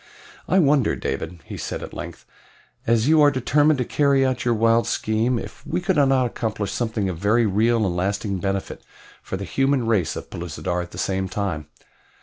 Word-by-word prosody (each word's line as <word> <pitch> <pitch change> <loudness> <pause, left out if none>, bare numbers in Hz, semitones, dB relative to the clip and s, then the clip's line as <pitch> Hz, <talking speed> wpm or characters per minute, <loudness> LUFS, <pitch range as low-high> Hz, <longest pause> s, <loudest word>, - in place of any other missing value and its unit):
"I 190 - +3
wonder, 145 - +3
David," 80 +5 -4
he - - -7
said - - -5
at - - -8
length, - - -8 0.6
"as 115 +1 +3
you 155 0 +5
are 145 - +7
determined 145 +3 +2
to 125 - -1
carry 140 -1 +2
out 130 -2 -1
your 120 -1 +2
wild 115 +1 +3
scheme, 110 +3 0
if - - -8
we - - -2
could 185 +1 0
not 135 -3 +4
accomplish 110 -4 -3
something 110 -3 -1
of 90 -3 -4
very 110 +5 +3
real 110 +2 +2
and 90 -2 -1
lasting 100 +1 -1
benefit 95 +1 -3 0.4
for 95 - -5
the 100 - -5
human 135 +4 +1
race 105 -8 +1
of - - -8
Pellucidar 85 +1 -3
at 90 - -7
the - - -11
same 95 0 -1
time. 95 -6 -3
110 Hz, 190 wpm, -23 LUFS, 95-130 Hz, 0.6 s, are